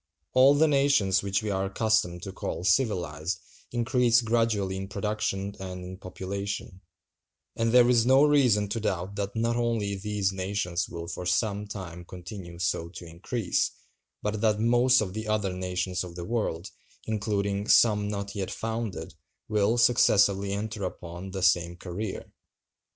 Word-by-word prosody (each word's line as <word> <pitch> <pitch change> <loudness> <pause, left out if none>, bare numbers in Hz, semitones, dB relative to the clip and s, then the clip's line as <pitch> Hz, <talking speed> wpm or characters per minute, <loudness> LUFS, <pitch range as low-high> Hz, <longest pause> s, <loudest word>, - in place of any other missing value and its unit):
All 135 +2 +6
the 160 +2 +4
nations 135 -10 +3
which 100 +1 -1
we 105 - -1
are 95 0 0
accustomed 100 -4 0
to 95 - -5
call 90 - -5
civilized 90 - 0 0.3
increase 120 0 +3
gradually 110 -4 +1
in 95 0 -5
production 100 -1 -2
and 90 -1 -6
in 95 +1 -8
population: 95 0 -5 0.7
and 115 0 +1
there 125 0 +6
is 120 -2 +4
no 130 +3 +5
reason 130 -9 +4
to 115 - -2
doubt 95 -3 -2
that 100 0 -3
not 115 +1 +1
only 115 -4 0
these 100 -1 -1
nations 95 -2 -2
will 85 -1 -6
for 90 +1 -5
some 105 +1 0
time 90 -4 -7
continue 90 0 -9
so 85 -1 -1
to 90 0 -10
increase, 90 +5 -1 0.5
but 105 0 -2
that 105 -2 +2
most 120 +3 +4
of 95 -3 -3
the 110 +1 -5
other 105 -3 0
nations 90 0 -2
of 90 -2 -9
the 85 -1 -6
world, 100 -6 -2 0.3
including 100 -2 -1
some 105 -3 +5
not 100 -1 -4
yet 95 -2 -3
founded, 110 -7 -4 0.3
will 105 +2 +2
successively 100 -4 +4
enter 105 +1 -3
upon 90 0 -6
the 95 -1 -4
same 85 -2 +3
career. 95 +4 -6
100 Hz, 155 wpm, -27 LUFS, 95-110 Hz, 0.7 s, All